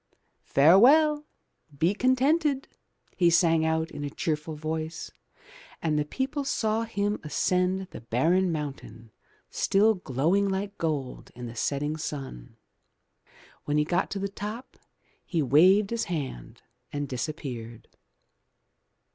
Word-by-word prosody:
"Farewell, 290 - +5 0.5
be 170 +7 +2
contented," 270 +4 +2 0.5
he 175 -2 +4
sang 165 -1 +3
out 160 0 0
in 145 - -6
a 145 - -3
cheerful 155 +1 -3
voice, 160 +1 -4 0.7
and 155 -2 0
the 150 - 0
people 270 - -3
saw 225 -4 0
him 205 -2 -1
ascend 180 +5 0
the - - -9
barren 165 +11 +1
mountain 135 -7 -6 0.4
still 210 +3 +3
glowing 180 - 0
like 195 +1 -3
gold 150 -6 -3
in 125 0 -7
the 115 0 -8
setting 145 +6 -1
sun. 135 - -7 1.1
When 145 0 0
he 150 - +2
got 175 +3 0
to 200 - -4
the 200 0 -2
top, 210 +6 -7 0.5
he 165 -4 -1
waved 185 - +5
his 230 -1 -1
hand 140 - -6 0.3
and 145 0 -3
disappeared. 120 -3 -6
165 Hz, 120 wpm, -27 LUFS, 145-205 Hz, 1.1 s, Farewell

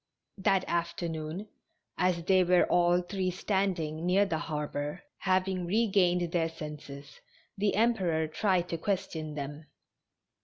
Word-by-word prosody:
That 190 -1 +2
afternoon, 170 +1 -3 0.5
as 180 -2 +1
they 185 +1 +4
were 180 0 +4
all 175 0 +3
three 185 0 -2
standing 180 -4 -1
near 185 +3 +4
the 165 -5 -1
harbor, 150 - -4 0.2
having 185 -1 0
regained 180 -4 +2
their 165 -2 +1
senses, 150 -3 -9 0.4
the 205 0 +1
Emperor 190 -8 +2
tried 180 +2 +1
to 165 - -3
question 160 -5 -2
them. 145 +2 -6
175 Hz, 120 wpm, -30 LUFS, 160-190 Hz, 0.5 s, they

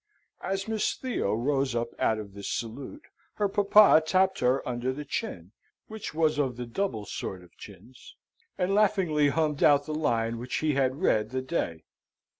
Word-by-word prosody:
As 195 +1 -3
Miss 220 -1 0
Theo 250 - -2
rose 135 +1 0
up 115 0 -1
out 110 - +2
of 105 -2 -8
this 100 0 -6
salute, 135 - -5 0.3
her 205 - +1
papa 200 -3 +6
tapped 190 +3 +2
her 125 +2 +1
under 125 +1 -2
the 145 +3 -6
chin 90 -8 -5 0.4
(which 220 -1 -6
was 155 -1 +1
of 130 -4 -1
the 125 - -4
double 120 - -3
sort 95 -2 -6
of 90 - -20
chins), 105 +6 -14 0.4
and 185 +2 0
laughingly 185 -8 +3
hummed 150 -1 0
out 145 -1 +5
the 155 - -4
line 115 -6 0
which 125 +1 -5
he 155 -1 +1
had 135 +4 0
read 105 -8 +2
the 130 0 -3
day. 85 - -3
140 Hz, 175 wpm, -27 LUFS, 115-180 Hz, 0.4 s, papa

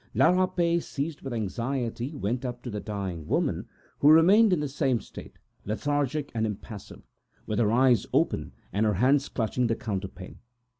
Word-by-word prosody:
La - - +5
Rapet 180 -2 +2
was 170 - -4
seized 145 +2 -4
with 135 - -6
anxiety, 120 +3 -2
and 145 -7 -9
went 120 +6 -1
up 120 -1 -5
to 120 - -5
the 105 - -3
dying 95 -7 -5
woman, - - 0 0.3
who 145 - +4
was 160 +2 +8
in 210 -6 +5
the 150 - -1
same 135 -3 0
state, - - -12 0.3
lethargic 145 +6 -1
and 110 -1 0
impassive, 105 0 -8 0.4
her 110 0 +1
eyes 125 -2 +4
open - - +1 0.2
and 105 +3 +2
her 105 - +1
hands 135 +7 +3
clutching 120 +1 0
the 115 - +1
counterpane. 95 -5 -6
125 Hz, 170 wpm, -27 LUFS, 110-145 Hz, 0.4 s, was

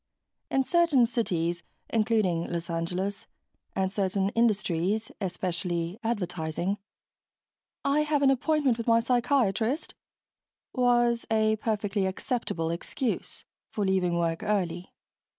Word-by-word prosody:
In 270 - +2
certain 330 -5 +4
cities 175 -8 -1 0.3
including 215 -7 +1
Los 170 0 -3
Angeles 180 +4 -2 0.5
and 190 0 0
certain 195 -1 0
industries 210 -2 +1
especially 175 0 -2
advertising 180 -3 -2 1.1
"I 280 +2 +3
have 300 -1 +1
an 270 - +6
appointment 270 -2 +2
with 230 - -4
my 230 0 +5
psychiatrist" 245 - +1 0.8
was 240 -2 +2
a 220 -1 +2
perfectly 210 -3 -1
acceptable 190 -5 -2
excuse 220 +8 -3 0.2
for 205 - -2
leaving 185 -2 +1
work 165 -1 0
early. 180 -4 -1
210 Hz, 105 wpm, -28 LUFS, 180-235 Hz, 1.1 s, an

